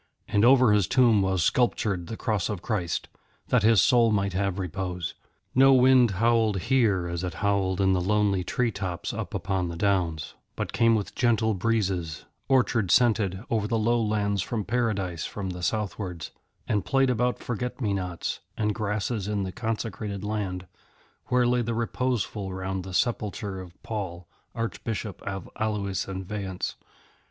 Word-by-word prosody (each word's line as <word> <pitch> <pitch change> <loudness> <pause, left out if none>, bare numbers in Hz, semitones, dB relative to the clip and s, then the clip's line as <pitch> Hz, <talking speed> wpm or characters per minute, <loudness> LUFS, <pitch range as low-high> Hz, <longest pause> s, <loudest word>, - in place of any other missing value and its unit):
And 105 0 +2
over 125 -3 +6
his 105 -4 +3
tomb 120 -5 +4
was 95 -3 +1
sculptured 100 -7 +1
the 110 - -6
Cross 105 -5 -1
of 100 -4 -4
Christ, 90 -7 -2 0.4
that 125 - +4
his 110 -3 +5
soul 120 -2 +4
might 100 -2 0
have 100 0 -1
repose. 90 -2 -3 0.4
No 135 +1 +6
wind 130 -1 +6
howled 115 -2 +3
here 110 -7 +2
as 85 +1 -3
it 90 -3 -3
howled 100 -2 0
in 95 -1 +3
lonely 100 +1 +1
tree 120 +5 0
tops 95 -4 -4
up - - -5
upon 95 -1 -1
the 85 - -5
downs, 85 -5 0 0.2
but - - -4
came 115 -1 +4
with 105 -2 -3
gentle 115 -3 +2
breezes, 95 -6 -1 0.2
orchard 120 -6 +2
scented, 105 -5 +3
over 110 -3 +1
the 115 - 0
low 115 +2 +2
lands 105 -2 0
from 105 +1 -3
Paradise 100 -7 -1
from 95 -3 -4
the 90 0 -7
southwards, 90 -4 -3 0.4
and 105 -3 +1
played 135 +2 +2
about 125 -1 +1
forget 125 +2 -4
me 105 -6 0
nots 90 -3 -3 0.2
and 105 -1 +1
grasses 105 0 -2
in 105 -1 -1
the 95 - -4
consecrated 105 -2 -4
land 100 -4 -3 0.6
where 125 0 +3
lay 125 0 +2
the 115 0 -2
Reposeful 115 -4 -2
round 95 0 -3
the 95 -1 -6
sepulchre 105 -4 -1
of 90 -1 -11
Paul, 90 -6 -5 0.3
Archbishop 115 -2 -4
of 95 -2 -4
Alois 100 -3 -1
and 95 -1 -5
Vayence. 95 -2 -4
105 Hz, 160 wpm, -26 LUFS, 95-115 Hz, 0.6 s, over